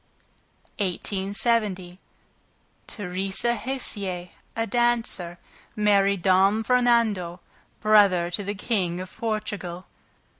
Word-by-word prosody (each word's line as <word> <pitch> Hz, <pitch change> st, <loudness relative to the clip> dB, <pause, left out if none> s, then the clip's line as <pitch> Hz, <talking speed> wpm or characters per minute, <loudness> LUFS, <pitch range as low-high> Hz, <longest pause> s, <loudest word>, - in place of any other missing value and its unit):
1870. 195 Hz, 0 st, 0 dB, 0.9 s
Theresa 195 Hz, +3 st, -1 dB
Hessier, 205 Hz, -7 st, -3 dB, 0.3 s
a 225 Hz, 0 st, 0 dB
dancer, 230 Hz, -7 st, 0 dB, 0.4 s
married 200 Hz, -3 st, +2 dB
Dom 195 Hz, +3 st, +4 dB
Fernando, 230 Hz, -8 st, +2 dB, 0.4 s
brother 200 Hz, -5 st, +4 dB
to 190 Hz, +4 st, -2 dB
the 205 Hz, +1 st, -4 dB
King 190 Hz, -5 st, -1 dB
of 185 Hz, 0 st, -8 dB
Portugal. 205 Hz, -5 st, -4 dB
200 Hz, 80 wpm, -25 LUFS, 185-225 Hz, 0.9 s, Dom